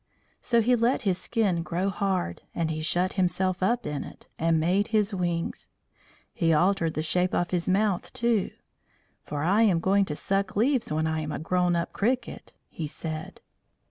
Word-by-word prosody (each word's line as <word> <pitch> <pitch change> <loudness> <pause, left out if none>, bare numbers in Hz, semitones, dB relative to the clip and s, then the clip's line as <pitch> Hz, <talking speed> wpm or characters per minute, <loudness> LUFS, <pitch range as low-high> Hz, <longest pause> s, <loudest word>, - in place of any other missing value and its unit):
So 235 -1 +2
he 245 +3 +3
let 235 +2 +1
his 190 -3 +1
skin 200 -7 0
grow 180 +3 -1
hard, 185 - -1
and 165 -2 0
he 155 0 -3
shut 175 +4 +1
himself 185 0 0
up 235 +6 +1
in 150 -1 -3
it, - - -12
and 165 0 +2
made 185 +6 +2
his 215 -2 +1
wings. 175 -3 -2 0.6
He 165 -3 +1
altered 165 0 +2
the 155 - -1
shape 180 +3 +1
of 175 - 0
his 180 0 0
mouth, 195 -1 +1
too. 235 -4 +1 0.7
"For 145 -1 -4
I 195 +7 +3
am 195 -7 +4
going 195 +3 +3
to 150 - -4
suck 195 +4 -1
leaves 245 - +1
when 155 +1 0
I 160 0 0
am 155 -1 -4
a - - -3
grown 180 +2 +1
up 170 0 -2
cricket," 240 +3 -2 0.2
he 160 - -5
said. 155 +1 -6
180 Hz, 180 wpm, -27 LUFS, 165-200 Hz, 0.7 s, am